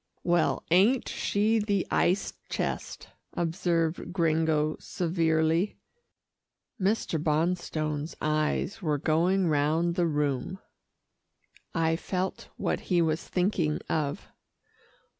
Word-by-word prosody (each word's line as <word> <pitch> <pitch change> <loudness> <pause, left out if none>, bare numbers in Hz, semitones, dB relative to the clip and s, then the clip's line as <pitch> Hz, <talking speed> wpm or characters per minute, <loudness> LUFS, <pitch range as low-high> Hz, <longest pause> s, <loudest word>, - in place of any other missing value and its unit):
"Well, 175 -1 +2
ain't 210 +9 +4
she 215 +2 +1
the 205 -3 0
ice 190 +3 +1 0.2
chest," - - -4 0.2
observed 170 0 -1
Gringo 160 -3 +1
severely. 165 +1 0 1.0
Mr. 190 -5 0
Bonstone's 155 -1 -1
eyes 155 +7 0
were 155 -4 0
going 175 +6 +2
round 155 +3 +2
the 175 -1 +1
room. 150 +2 -1 1.2
I 165 -1 +2
felt 185 +2 -3
what - - -1
he 180 -2 +3
was 160 -1 +1
thinking 180 -5 0
of. 150 +2 -1
165 Hz, 95 wpm, -28 LUFS, 155-185 Hz, 1.2 s, ain't